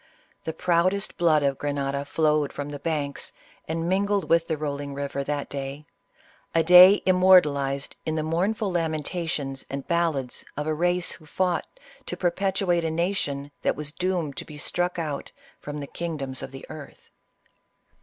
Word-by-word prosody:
The 160 - -1
proudest 180 +4 +1
blood 160 -4 +3
of 140 -1 0
Grenada 140 -1 -2
flowed 150 -1 +1
from 145 0 -5
the 145 -1 -6
banks 145 -2 -3 0.3
and 165 +1 -2
mingled 200 +2 +1
with 165 0 +4
the 160 - -1
rolling 145 -1 -4
river 140 0 -3
that 145 0 -2
day 140 +1 -6 0.3
— - - -27
a 165 - +5
day 180 +4 +9
immortalized 150 -7 +4
in 155 - -2
the 155 - 0
mournful 190 +6 0
lamentations 160 -4 -2
and 140 0 -5
ballads 165 -7 0
of 150 - -2
a 155 - 0
race 175 +2 +1
who 155 - -7
fought 180 +2 0 0.4
to - - -4
perpetuate 185 -1 +1
a 165 - 0
nation 160 -5 -1
that - - +1
was 150 0 -3
doomed 175 -4 -1
to - - -4
be 150 - -10
struck 175 +4 -1
out 150 -4 -4 0.3
from 150 0 -6
the 145 - -4
kingdoms 140 -5 -4
of - - -6
the 135 0 -10
earth. 150 -3 -11
155 Hz, 165 wpm, -26 LUFS, 140-175 Hz, 0.4 s, day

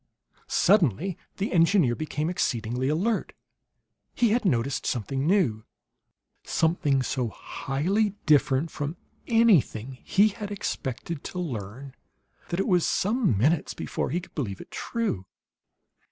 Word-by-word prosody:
Suddenly 180 - +3 0.2
the 200 - -2
engineer 165 -6 +4
became 155 +1 -3
exceedingly 125 -6 -1
alert. 195 +9 0 0.8
He 240 -2 +3
had 235 0 +1
noticed 130 -4 0
something 135 +4 -1
new 145 - +2 0.8
something 150 -5 +1
so 125 -1 -1
highly 185 - -1
different 150 0 +3
from 150 +3 -4 0.3
anything 155 - +3
he 205 +2 +4
had 205 0 -6
expected 165 - -4
to - - -6
learn 130 - -5 0.6
that 170 - -2
it 195 - +1
was 180 -3 +3
some 210 - +1
minutes 145 - +1
before - - -3
he 175 - 0
could 175 - -13
believe 105 - -3
it - - -12
true. 215 - -3
155 Hz, 125 wpm, -26 LUFS, 130-195 Hz, 0.8 s, engineer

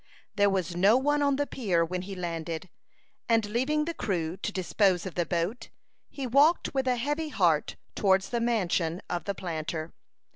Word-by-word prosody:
There 205 -1 +4
was 185 -3 -1
no 200 +7 +5
one 290 +2 +1
on 280 -1 +3
the 290 +1 0
pier 185 -12 0
when 180 +2 -3
he 195 +1 -7
landed; 170 0 -4 0.6
and 225 -2 +3
leaving 265 +8 0
the 335 - -3
crew 175 - -2
to 205 - -3
dispose 190 -1 +1
of 185 - -5
the 175 -2 -1
boat, 180 +8 -2 0.4
he 275 - -5
walked 285 +7 +3
with 265 -1 0
a 250 - +3
heavy 295 +6 -2
heart 170 - +1 0.2
towards 190 -1 +2
the 235 -1 -1
mansion 185 -7 0
of 175 -2 -2
the 200 - -2
planter. 160 -2 -4
195 Hz, 180 wpm, -28 LUFS, 175-250 Hz, 0.6 s, no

